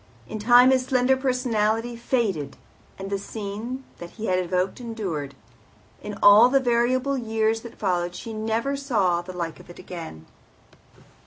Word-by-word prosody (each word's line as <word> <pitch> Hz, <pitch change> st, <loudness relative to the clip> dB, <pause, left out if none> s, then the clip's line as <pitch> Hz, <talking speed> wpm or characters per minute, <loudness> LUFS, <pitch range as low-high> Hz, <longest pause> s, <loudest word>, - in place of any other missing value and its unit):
In 215 Hz, -, -6 dB
time 245 Hz, +4 st, +6 dB
his 260 Hz, -1 st, +3 dB
slender 260 Hz, 0 st, +3 dB
personality 240 Hz, -3 st, 0 dB
faded, 215 Hz, -, -1 dB, 0.4 s
the 195 Hz, +1 st, -4 dB
scene 215 Hz, +5 st, -6 dB, 0.2 s
that 175 Hz, -, -8 dB
he 220 Hz, +4 st, -7 dB
had 185 Hz, -2 st, +1 dB
evoked 185 Hz, +4 st, -1 dB
endured. 185 Hz, -, -5 dB, 0.7 s
In 210 Hz, -1 st, -7 dB
all 210 Hz, +4 st, +8 dB
the 275 Hz, +1 st, +4 dB
variable 255 Hz, +2 st, +1 dB
years 225 Hz, -1 st, 0 dB
that 235 Hz, -1 st, -11 dB
followed 175 Hz, -3 st, -1 dB
she 225 Hz, +5 st, -7 dB
never 225 Hz, +5 st, -1 dB
saw 210 Hz, -11 st, +1 dB
the 180 Hz, +1 st, -9 dB
like 170 Hz, -3 st, -5 dB
of -, -, -16 dB
it 175 Hz, -, -12 dB
again. 160 Hz, -, -9 dB
220 Hz, 150 wpm, -24 LUFS, 185-245 Hz, 0.7 s, all